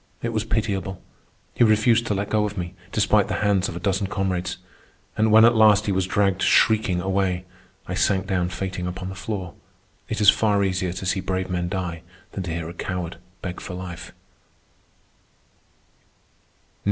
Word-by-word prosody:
It 115 Hz, -, 0 dB
was 110 Hz, 0 st, -1 dB
pitiable. 100 Hz, -4 st, -2 dB, 0.5 s
He -, -, +3 dB
refused 115 Hz, +1 st, +4 dB
to 105 Hz, -, 0 dB
let 100 Hz, +1 st, -3 dB
go 110 Hz, -1 st, +2 dB
of 105 Hz, 0 st, -3 dB
me, 90 Hz, -1 st, -4 dB, 0.2 s
despite -, -, +3 dB
the -, -, -2 dB
hands 100 Hz, 0 st, +2 dB
of -, -, -7 dB
a -, -, -4 dB
dozen 100 Hz, -1 st, 0 dB
comrades. 90 Hz, -2 st, -2 dB, 0.6 s
And 110 Hz, 0 st, +2 dB
when 110 Hz, +1 st, +8 dB
at 120 Hz, -, +6 dB
last 105 Hz, -1 st, +5 dB
he 100 Hz, -, 0 dB
was 95 Hz, -1 st, 0 dB
dragged 95 Hz, -1 st, +1 dB
shrieking 110 Hz, -5 st, +3 dB
away, 95 Hz, -1 st, -1 dB, 0.4 s
I -, -, -3 dB
sank 95 Hz, -1 st, +1 dB
down 90 Hz, -2 st, 0 dB
fainting 90 Hz, 0 st, -4 dB
upon 90 Hz, +1 st, -5 dB
the -, -, -6 dB
floor. 95 Hz, -2 st, -5 dB, 0.6 s
It 110 Hz, -, -2 dB
is 105 Hz, -1 st, +8 dB
far 105 Hz, -2 st, +2 dB
easier 95 Hz, -2 st, 0 dB
to 90 Hz, +1 st, -6 dB
see 95 Hz, +1 st, 0 dB
brave 95 Hz, 0 st, -2 dB
men 90 Hz, -1 st, -1 dB
die 90 Hz, -3 st, -3 dB, 0.3 s
than 100 Hz, -, -5 dB
to 85 Hz, -, -4 dB
hear 80 Hz, -1 st, -3 dB
a 85 Hz, -, -7 dB
coward 90 Hz, -1 st, -4 dB, 0.3 s
beg 90 Hz, -1 st, -5 dB
for 90 Hz, -, -6 dB
life. 90 Hz, -2 st, -7 dB
95 Hz, 175 wpm, -23 LUFS, 90-105 Hz, 0.6 s, when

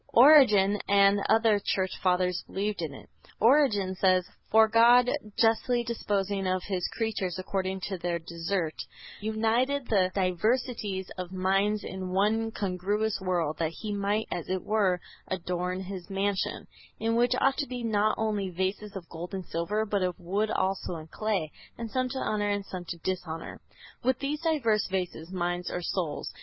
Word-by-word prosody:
Origen 220 Hz, -7 st, +7 dB
and 200 Hz, 0 st, +5 dB
other 220 Hz, -2 st, +4 dB
Church 190 Hz, -1 st, 0 dB
Fathers 180 Hz, -1 st, +1 dB
believed 205 Hz, 0 st, -2 dB
in 160 Hz, -3 st, -3 dB
it. 135 Hz, -, -12 dB, 0.3 s
Origen 220 Hz, -6 st, +4 dB
says: 185 Hz, -1 st, +2 dB, 0.2 s
"For 220 Hz, 0 st, +6 dB
God, 235 Hz, +2 st, +6 dB, 0.3 s
justly 240 Hz, +2 st, +2 dB
disposing 200 Hz, -4 st, -1 dB
of 185 Hz, -1 st, 0 dB
his 185 Hz, -3 st, -2 dB
creatures 195 Hz, -5 st, -2 dB
according 190 Hz, 0 st, -2 dB
to 190 Hz, 0 st, -4 dB
their 175 Hz, 0 st, -1 dB
desert, 170 Hz, 0 st, -3 dB, 0.5 s
united 225 Hz, +6 st, 0 dB
the 190 Hz, -4 st, +3 dB
diversities 200 Hz, +1 st, 0 dB
of 180 Hz, -1 st, -5 dB
minds 195 Hz, +3 st, +1 dB
in 190 Hz, -1 st, -5 dB
one 210 Hz, +4 st, +1 dB
congruous 205 Hz, +1 st, -1 dB
world, 175 Hz, -5 st, -1 dB
that 165 Hz, -1 st, -1 dB
he 210 Hz, +4 st, -5 dB
might, 205 Hz, +2 st, 0 dB
as 175 Hz, -3 st, -4 dB
it 185 Hz, -1 st, -1 dB
were, 200 Hz, -4 st, +2 dB, 0.3 s
adorn 180 Hz, 0 st, -2 dB
his 190 Hz, 0 st, -7 dB
mansion 195 Hz, 0 st, -1 dB, 0.3 s
(in 225 Hz, +1 st, 0 dB
which 240 Hz, +1 st, +3 dB
ought 270 Hz, 0 st, +2 dB
to 285 Hz, -, -1 dB
be 250 Hz, -1 st, -5 dB
not 215 Hz, -1 st, +2 dB
only 210 Hz, -3 st, -1 dB
vases 190 Hz, +3 st, -3 dB
of 180 Hz, -3 st, -7 dB
gold 175 Hz, +4 st, -7 dB
and 190 Hz, -2 st, -5 dB
silver, 200 Hz, +8 st, -1 dB
but 205 Hz, -2 st, -1 dB
of 180 Hz, -1 st, -1 dB
wood 200 Hz, +5 st, -1 dB
also 190 Hz, -3 st, -1 dB
and 155 Hz, -1 st, -9 dB
clay, 200 Hz, -8 st, -1 dB, 0.3 s
and 230 Hz, -2 st, -6 dB
some 255 Hz, -1 st, 0 dB
to 265 Hz, -, -5 dB
honor 210 Hz, -4 st, 0 dB
and 205 Hz, -1 st, -1 dB
some 180 Hz, -2 st, -7 dB
to 170 Hz, -, -5 dB
dishonor) 175 Hz, -3 st, -4 dB, 0.4 s
with 260 Hz, +1 st, +2 dB
these 290 Hz, +2 st, -3 dB
diverse 255 Hz, -, +1 dB
vases, 180 Hz, -3 st, -3 dB
minds 175 Hz, -1 st, -2 dB
or 180 Hz, -, -4 dB
souls. 170 Hz, -5 st, -3 dB
195 Hz, 165 wpm, -28 LUFS, 180-220 Hz, 0.5 s, Origen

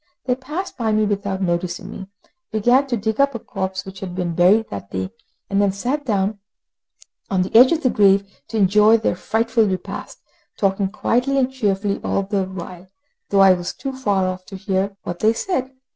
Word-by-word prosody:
They 255 Hz, -, +2 dB
passed 300 Hz, +9 st, -5 dB
by 225 Hz, -2 st, +1 dB
me 215 Hz, 0 st, +3 dB
without 200 Hz, -2 st, -2 dB
noticing 175 Hz, 0 st, -2 dB
me, 190 Hz, -, -8 dB, 0.4 s
began 245 Hz, +6 st, +3 dB
to 245 Hz, -3 st, -1 dB
dig 220 Hz, +4 st, 0 dB
up 280 Hz, -2 st, +2 dB
a -, -, -3 dB
corpse 190 Hz, -2 st, -4 dB
which 190 Hz, 0 st, -9 dB
had 185 Hz, -2 st, -6 dB
been 180 Hz, -2 st, -2 dB
buried 185 Hz, +6 st, +4 dB
that 100 Hz, 0 st, -6 dB
day, 95 Hz, 0 st, -4 dB, 0.4 s
and 200 Hz, 0 st, +1 dB
then 200 Hz, -1 st, +3 dB
sat 260 Hz, +9 st, -3 dB
down 200 Hz, -1 st, 0 dB, 0.9 s
on 185 Hz, -2 st, +2 dB
the 185 Hz, -, -7 dB
edge 250 Hz, +3 st, +8 dB
of 330 Hz, -1 st, 0 dB
the 255 Hz, -, +3 dB
grave, 200 Hz, -1 st, +4 dB, 0.2 s
to 225 Hz, -, -4 dB
enjoy 210 Hz, +3 st, +5 dB
their 220 Hz, -, 0 dB
frightful 225 Hz, +4 st, +1 dB
repast, 185 Hz, -2 st, -5 dB, 0.4 s
talking 195 Hz, 0 st, +1 dB
quietly 250 Hz, +5 st, 0 dB
and 260 Hz, -1 st, +2 dB
cheerfully 200 Hz, -4 st, -1 dB
all 195 Hz, -, 0 dB
the 195 Hz, -1 st, -1 dB
while, 185 Hz, -1 st, -9 dB, 0.4 s
though 200 Hz, -1 st, +4 dB
I 190 Hz, -1 st, +8 dB
was 175 Hz, -1 st, -4 dB
too 270 Hz, -, -5 dB
far 205 Hz, -8 st, 0 dB
off 185 Hz, 0 st, -3 dB
to 195 Hz, -, -9 dB
hear 195 Hz, +1 st, -2 dB
what 175 Hz, 0 st, -5 dB
they 220 Hz, +1 st, +3 dB
said. 260 Hz, -1 st, -2 dB
200 Hz, 195 wpm, -21 LUFS, 190-230 Hz, 0.9 s, edge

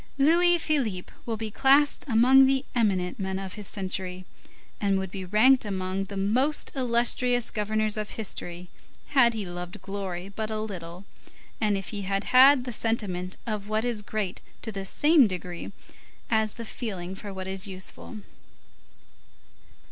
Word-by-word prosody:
Louis 345 Hz, +5 st, +5 dB
Philippe 260 Hz, -, -1 dB
will 225 Hz, -1 st, -2 dB
be 220 Hz, 0 st, -4 dB
classed 280 Hz, +5 st, +3 dB
among 260 Hz, +3 st, +6 dB
the 270 Hz, 0 st, +1 dB
eminent 195 Hz, -7 st, 0 dB
men 190 Hz, -1 st, -2 dB
of 190 Hz, -1 st, -6 dB
his 210 Hz, -2 st, -7 dB
century, 185 Hz, -2 st, -4 dB, 0.5 s
and 200 Hz, -2 st, +2 dB
would 190 Hz, -1 st, -3 dB
be 190 Hz, 0 st, -5 dB
ranked 245 Hz, +8 st, +5 dB
among 190 Hz, -1 st, -2 dB
the 200 Hz, 0 st, -7 dB
most 250 Hz, +10 st, +1 dB
illustrious 245 Hz, -1 st, +1 dB
governors 215 Hz, 0 st, -1 dB
of 210 Hz, -1 st, -3 dB
history 180 Hz, -4 st, -6 dB, 0.4 s
had 245 Hz, -5 st, +4 dB
he 210 Hz, -3 st, -3 dB
loved 175 Hz, 0 st, -7 dB
glory 195 Hz, -2 st, -5 dB
but 215 Hz, +2 st, -4 dB
a 215 Hz, -1 st, -2 dB
little, 180 Hz, -3 st, -7 dB, 0.6 s
and 210 Hz, -2 st, +2 dB
if 195 Hz, -, -6 dB
he 205 Hz, -2 st, -4 dB
had 195 Hz, +1 st, -1 dB
had 260 Hz, +1 st, +6 dB
the 250 Hz, -, -5 dB
sentiment 195 Hz, -6 st, -2 dB
of 210 Hz, -3 st, -3 dB
what 215 Hz, +2 st, 0 dB
is 235 Hz, -3 st, -2 dB
great 210 Hz, -3 st, -3 dB, 0.2 s
to 225 Hz, -, -4 dB
the 195 Hz, -2 st, -5 dB
same 295 Hz, -, +5 dB
degree 180 Hz, -2 st, -6 dB, 0.6 s
as 220 Hz, -1 st, +2 dB
the 230 Hz, -, -7 dB
feeling 190 Hz, -6 st, -5 dB
for 200 Hz, +1 st, -7 dB
what 190 Hz, -1 st, -6 dB
is 190 Hz, +1 st, -2 dB
useful. 190 Hz, +3 st, -7 dB
210 Hz, 155 wpm, -27 LUFS, 190-240 Hz, 0.6 s, among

